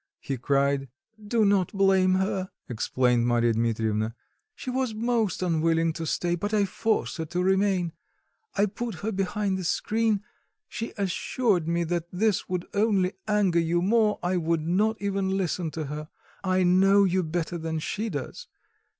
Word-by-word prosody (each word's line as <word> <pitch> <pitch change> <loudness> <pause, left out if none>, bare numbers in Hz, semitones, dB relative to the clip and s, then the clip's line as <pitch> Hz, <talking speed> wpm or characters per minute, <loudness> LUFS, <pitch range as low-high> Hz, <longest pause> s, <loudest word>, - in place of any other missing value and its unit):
he 135 - -3
cried. 140 +1 +1 0.3
"Do 220 +1 +2
not 200 -3 +2
blame 190 -1 +4
her," 190 0 -1 0.2
explained 120 0 +1
Marya 120 -1 +3
Dmitrievna; 110 -1 0 0.4
"she 255 - -5
was 255 -3 -1
most 225 -5 0
unwilling 165 -1 +2
to 165 0 -5
stay, 175 +2 0
but 205 +5 -1
I 205 -1 +3
forced 215 +2 -1
her 160 - -3
to 175 +3 -2
remain. 190 -3 +2 0.6
I 205 - +3
put 220 +1 -4
her 220 - 0
behind 195 0 -1
the - - -4
screen. 215 +3 0 0.4
She 230 - -5
assured 195 -1 0
me 170 +1 +1
that 170 0 -2
this 205 +2 0
would 180 -1 -2
only 200 -3 +2
anger 205 -5 +3
you 170 +1 +1
more; 215 +1 +3
I 180 +1 +1
would 165 -1 0
not 205 +7 +1
even 195 -1 -1
listen 180 -2 -1
to 155 +1 -5
her; 150 +2 -6 0.3
I 185 -1 +2
know 195 +3 +5
you 185 -1 +2
better 170 +1 -3
than 160 0 -3
she 210 +8 -3
does. 145 -8 -6
185 Hz, 160 wpm, -26 LUFS, 160-205 Hz, 0.6 s, know